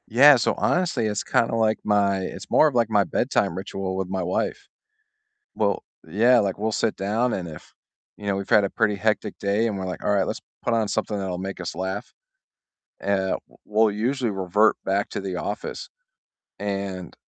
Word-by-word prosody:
Yeah, 140 +6 +8
so 120 - +1
honestly, 175 -10 +1
it's 105 0 -2
kinda 115 - +1
like 110 -1 +2
my 100 -2 +2
It's 95 - -6
more 155 - +5
of 145 - -2
like 115 -2 +3
my 105 -2 +4
bedtime 85 -1 0
ritual 95 0 -4
with 95 -1 -3
my 95 -1 -2
wife. - - -2 0.9
Well, 100 -1 0 0.2
yeah, 115 +9 +4
like 100 -4 0
we'll 110 +2 -1
sit 110 0 0
down 110 +5 0
and 90 -2 -3
if, 75 - -11 0.4
you 105 - -10
know, 100 -1 +1
we've 100 0 -5
had 105 - +5
a 100 - -1
pretty 110 -3 +1
hectic 105 0 -1
day 100 +3 +1
and 105 -3 -2
we're 95 - -4
like, 90 - -5
"All - - +1
right, 95 -2 +3
let's - - -4 0.2
put - - 0
on 110 -2 +1
something 105 0 -1
that'll 95 -2 -3
make 95 0 -5
us 85 - -4
laugh," 95 +3 -4 0.9
e - - -8
uh, 100 -1 +1
w - - -15 0.2
we'll 110 +1 +3
usually 120 +4 -1
revert 100 +2 +2
back 100 +1 0
to - - -3
The 95 -2 -4
Office, 105 +3 -5 0.7
and 100 -3 -4
100 Hz, 200 wpm, -24 LUFS, 95-110 Hz, 0.9 s, Yeah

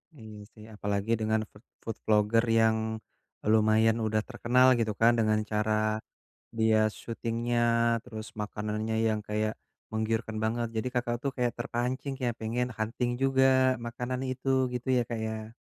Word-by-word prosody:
Iya 110 -4 -11 0.2
sih, 105 - -14
apalagi 105 +1 -2
dengan 110 0 +1
food 105 - -18 0.2
food 115 -1 -5
vlogger 110 +2 +3
yang 110 -1 +4 0.7
lumayan 110 +1 +4
udah 110 0 0
terkenal 125 +1 +3
gitu 110 -2 +1
kan 115 +1 +7
dengan 110 -1 +2
cara 110 0 +1 0.6
dia 110 -1 +3
shooting-nya, 115 +1 -2 0.4
terus 110 -3 -7
makanannya 105 +1 -3
yang 110 -1 0
kayak 110 +1 -1 0.4
menggiurkan 110 0 -2
banget, 115 +1 0
jadi 110 +3 -1
Kakak 120 -1 0
tuh 135 - 0
kayak 125 -1 +1
terpancing 130 +3 -2
ya 120 - +2
pengen 120 +3 -1
hunting 115 +3 -1
juga 135 0 +3 0.4
makanan 125 +2 -4
itu. 130 +1 -4 0.3
Gitu 125 +2 -4
ya, - - +3
Kak 115 -1 -3
ya? 110 0 -5
110 Hz, 145 wpm, -29 LUFS, 110-120 Hz, 0.7 s, kan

